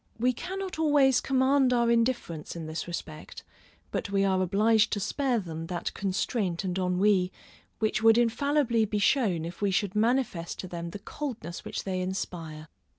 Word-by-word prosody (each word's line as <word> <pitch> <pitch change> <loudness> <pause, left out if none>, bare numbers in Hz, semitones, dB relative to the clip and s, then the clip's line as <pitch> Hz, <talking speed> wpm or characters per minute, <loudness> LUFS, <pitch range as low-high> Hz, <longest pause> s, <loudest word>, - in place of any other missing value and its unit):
We 250 +2 +2
cannot 380 +5 -5
always 290 -4 +4
command 265 0 +3
our 235 -1 +3
indifference 230 -11 -1
in 165 -2 -5
this 160 +2 -5
respect, 160 -3 -7 0.5
but - - -3
we 195 0 +2
are 190 -1 +2
obliged 215 +4 +3
to 205 - 0
spare 250 +5 0
them 165 -5 -5
that 175 -1 -3
constraint 195 -1 -1
and 180 -2 -2
ennui, 185 0 +2 0.5
which 215 0 0
would 225 0 +6
infallibly 240 0 +2
be 210 0 -2
shown 200 - +2
if 170 +4 -8
we 200 - +2
should 195 0 0
manifest 220 -6 0
to 185 - -7
them 170 -1 -5
the 185 - -7
coldness 220 - -6
which - - -5
they 185 -2 -2
inspire. 165 -4 -5
205 Hz, 165 wpm, -28 LUFS, 180-245 Hz, 0.5 s, would